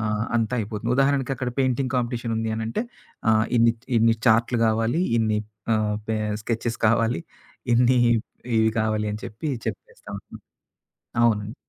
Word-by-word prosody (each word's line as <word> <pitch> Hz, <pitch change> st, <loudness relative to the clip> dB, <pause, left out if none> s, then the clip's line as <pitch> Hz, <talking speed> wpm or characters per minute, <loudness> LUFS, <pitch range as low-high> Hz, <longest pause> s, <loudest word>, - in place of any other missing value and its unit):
ఆహ్, 105 Hz, 0 st, -1 dB
అంతా 115 Hz, +2 st, 0 dB
అయిపోతుంది. 110 Hz, +2 st, -3 dB
ఉదాహరణకక్కడ 135 Hz, -2 st, +1 dB
పెయింటింగ్ 130 Hz, 0 st, +1 dB
కాంపిటీషన్ 120 Hz, -1 st, -2 dB
ఉంది 110 Hz, 0 st, -1 dB
అనంటే 115 Hz, -, -2 dB, 0.5 s
ఆహ్, 110 Hz, 0 st, +4 dB
ఇన్ని 115 Hz, 0 st, +5 dB, 0.3 s
ఇన్ని 115 Hz, 0 st, +4 dB
చార్టులు 115 Hz, +1 st, +4 dB
కావాలి. 115 Hz, +7 st, +1 dB, 0.2 s
ఇన్ని 110 Hz, -1 st, +1 dB, 0.4 s
ఆహ్, 105 Hz, -1 st, 0 dB
పే 110 Hz, -, 0 dB, 0.3 s
స్కెచెస్ 115 Hz, 0 st, -2 dB
కావాలి. 115 Hz, -4 st, +2 dB, 0.5 s
ఇన్ని 125 Hz, +1 st, +4 dB, 0.6 s
ఇవి 110 Hz, 0 st, +4 dB
కావాలి 110 Hz, -1 st, 0 dB
అని 105 Hz, -, -5 dB
చెప్పి, 115 Hz, +9 st, -5 dB, 0.2 s
చెప్పేస్తాం 110 Hz, -, -7 dB
అండి. -, -, -12 dB, 0.8 s
అవునండి. 110 Hz, -1 st, +1 dB
115 Hz, 135 wpm, -24 LUFS, 110-120 Hz, 0.8 s, ఇన్ని